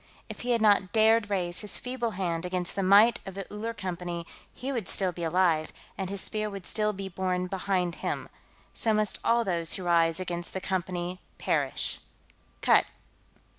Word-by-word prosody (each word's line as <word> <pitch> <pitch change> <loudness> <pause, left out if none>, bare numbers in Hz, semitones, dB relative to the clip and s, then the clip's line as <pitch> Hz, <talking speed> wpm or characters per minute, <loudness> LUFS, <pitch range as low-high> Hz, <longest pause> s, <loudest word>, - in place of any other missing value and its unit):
If - - -7
he 245 - -5
had 235 -2 +2
not 205 -3 +4
dared 220 -1 +4
raise 180 -3 0
his 210 -2 +1
feeble 250 -2 -2
hand 170 -3 -1
against 180 0 -2
the 195 - 0
might 200 +5 +6
of 195 - -8
the 195 -1 -5
Uller 220 +2 -3
Company, 175 -3 -4 0.3
he 265 +2 -5
would 235 -8 -2
still 190 -2 +1
be 170 0 -7
alive, 165 -2 +2 0.2
and 190 -1 -4
his 200 -1 +1
Spear 215 0 0
would 195 -3 -8
still 210 -1 +1
be 195 -1 -6
borne 185 -1 -1
behind 180 -1 -1
him. - - -2 0.5
So 220 -2 +3
must 215 -1 +1
all 235 0 +3
those 170 -3 +1
who 190 - -3
rise 165 -1 +3
against 175 -1 -4
the 190 - -2
Company 185 -1 -3 0.2
perish.... - - 0 0.6
Cut." - - +6
190 Hz, 180 wpm, -28 LUFS, 175-210 Hz, 0.6 s, might